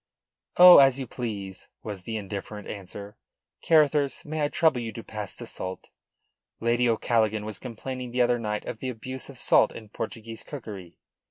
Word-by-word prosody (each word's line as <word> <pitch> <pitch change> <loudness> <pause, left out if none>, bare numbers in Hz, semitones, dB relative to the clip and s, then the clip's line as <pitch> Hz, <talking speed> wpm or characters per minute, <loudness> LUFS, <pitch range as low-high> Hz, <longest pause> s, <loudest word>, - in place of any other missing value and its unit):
"Oh, 180 0 +11
as 135 -1 +5
you 135 - -3
please," 105 -6 -6 0.2
was 100 -4 -7
the 110 -1 -3
indifferent 105 0 -6
answer. 100 +1 -8 0.4
"Carruthers, 150 -3 +3
may 155 +1 -3
I 145 - +3
trouble 150 -4 +2
you 115 -1 -4
to 115 - -7
pass 105 -4 -6
the - - -8
salt? 95 0 -7 0.7
Lady 120 +1 +2
O'Callaghan 110 -2 +1
was 110 -2 -5
complaining 125 +1 -6
the 125 +1 +2
other 120 0 +2
night 105 -2 -3
of 110 - -6
the 130 - -3
abuse 130 +3 -7
of 135 - -11
salt - - +4
in 110 -2 -11
Portuguese 115 +1 -6
cookery. 105 - -9
115 Hz, 170 wpm, -26 LUFS, 105-130 Hz, 0.7 s, Oh